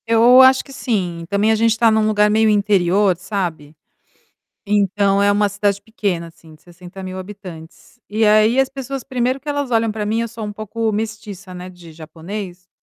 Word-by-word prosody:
Eu 235 +3 +6
acho 260 0 +5
que 275 - -14
sim. 180 -10 -3
Também 205 +2 +2
a - - +3
gente 225 0 +2
tá 230 -1 +4
num 220 0 +2
lugar 210 -1 +3
meio 220 +1 +3
interior, 200 -2 +2
sabe. 175 -6 -5 0.9
Então 200 -1 +1
é 205 0 +3
uma 205 0 +2
cidade 200 0 -1
pequena, 200 -6 -3
assim, 165 -1 -18
de 155 - -22
60.000 185 +2 -10
habitantes. 185 0 -11
E 220 +2 0
aí 215 +4 +4
as 270 - +1
pessoas 270 0 -6
primeiro 255 +1 -2
que 295 - -11
elas 285 -2 -2
olham 225 -1 +1
pra 210 -1 -4
mim, 220 +2 0
eu 230 - -2
sou 225 -1 -8
um 210 - -5
pouco 215 +1 -3
mestiça, 210 -3 -6
né, 180 0 -8
de 175 -3 -14
japonês, 175 +4 -9
210 Hz, 185 wpm, -19 LUFS, 185-225 Hz, 0.9 s, Eu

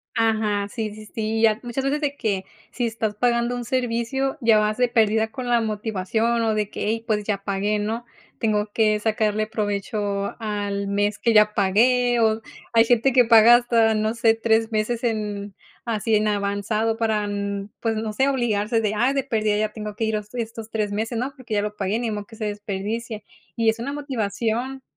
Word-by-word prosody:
Ajá, 215 -3 +1
sí, 215 0 -4
sí, 215 0 -11
sí, 220 +1 -2
ya 220 0 +4
muchas 245 +2 -3
veces 280 +2 0
de 285 -1 -1
que, 200 -8 -2 0.3
si 245 - -2
estás 220 -2 -2
pagando 240 +1 +1
un 245 -1 -5
servicio 255 +3 -1
ya 225 -2 +5
vas 210 0 0
de 250 0 +3
perdida 220 -1 +2
con 255 -1 -6
la 240 -1 +4
motivación, 220 +1 -1
o 220 -1 +1
de 210 -1 -1
que: - - -7
"Hey, 225 +1 -1
pues 210 -2 0
ya 200 -2 -2
pagué", 205 +1 0
¿no? 225 +3 -3 0.3
Tengo 210 -2 0
que 215 -1 +2
sacarle 215 0 0
provecho 205 -2 -2
al 205 -2 -3
mes 205 +1 0
que 235 - +1
ya 210 0 +5
pagué, 240 +5 +3
o 220 -1 +2 0.3
hay 230 0 +6
gente 245 +3 +3
que 250 -1 +5
paga 230 +1 +8
hasta 230 -2 +3
no 215 +1 0
sé, 230 -1 +3
3 225 0 +1
meses 220 +2 -1
en 210 -3 -2 0.3
así 225 -2 0
en 215 0 +2
avanzado 210 +2 0
para 220 -2 0
n 200 0 -3
pues 225 -1 -1
no 215 0 -3
sé, 265 +5 +2
obligarse 230 -4 0
de: 210 -1 0
"Ay, 245 +6 +1
de 275 - +1
perdida, 215 -5 0
ya 215 0 0
tengo 210 -1 -6
que 225 - -3
ir 220 -1 0
estos 225 -1 -5
3 215 -2 -2
meses, 225 +3 -2
¿no?, 255 +4 -2
porque 245 -4 -5
ya 205 - +1
lo 210 0 -4
pagué, 200 +1 -1
ni 235 -2 -2
modo 210 -1 -4
que 225 - -13
se 215 - -4
desperdicie", 210 +2 -4 0.3
y 230 -1 +2
es 220 +1 -1
una 275 +5 -3
motivación. 250 -1 -2
220 Hz, 200 wpm, -23 LUFS, 210-235 Hz, 0.3 s, paga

